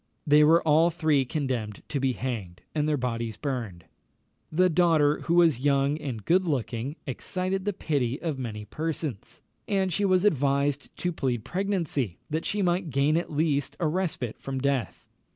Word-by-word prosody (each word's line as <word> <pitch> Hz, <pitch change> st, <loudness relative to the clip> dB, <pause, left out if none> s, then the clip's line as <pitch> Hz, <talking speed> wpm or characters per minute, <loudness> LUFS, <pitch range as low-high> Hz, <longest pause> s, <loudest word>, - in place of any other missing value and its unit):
They 150 Hz, 0 st, +6 dB
were 165 Hz, +3 st, +5 dB
all 160 Hz, +3 st, +5 dB
three 155 Hz, -5 st, +2 dB
condemned 125 Hz, -7 st, -3 dB
to 145 Hz, -, -1 dB
be 135 Hz, -1 st, +1 dB
hanged, 110 Hz, -9 st, -5 dB
and 150 Hz, 0 st, 0 dB
their 150 Hz, -, +2 dB
bodies 115 Hz, -3 st, -3 dB
burned. 115 Hz, -, -4 dB, 0.7 s
The 180 Hz, +4 st, +4 dB
daughter, 160 Hz, -4 st, +3 dB
who 170 Hz, -, +2 dB
was 165 Hz, -7 st, +5 dB
young 140 Hz, +2 st, +2 dB
and 125 Hz, -9 st, -5 dB
good 185 Hz, +3 st, +4 dB
looking, 135 Hz, -3 st, -2 dB
excited 185 Hz, +8 st, -3 dB
the 205 Hz, -, +1 dB
pity 140 Hz, -7 st, -1 dB
of 155 Hz, -6 st, -3 dB
many 110 Hz, -4 st, -5 dB
persons, 155 Hz, -, -4 dB, 0.2 s
and 190 Hz, -3 st, +1 dB
she 205 Hz, -, 0 dB
was 185 Hz, 0 st, +3 dB
advised 140 Hz, -4 st, +1 dB
to 180 Hz, -, -1 dB
plead 125 Hz, -7 st, -2 dB
pregnancy, 170 Hz, -, -1 dB
that 160 Hz, +2 st, -1 dB
she 205 Hz, -1 st, 0 dB
might 175 Hz, -1 st, +1 dB
gain 140 Hz, +2 st, +2 dB
at 170 Hz, 0 st, -1 dB
least 145 Hz, -2 st, 0 dB
a 175 Hz, -, 0 dB
respite 155 Hz, -, -2 dB
from 135 Hz, -1 st, -4 dB
death. 135 Hz, -2 st, -1 dB
145 Hz, 170 wpm, -27 LUFS, 130-170 Hz, 0.7 s, They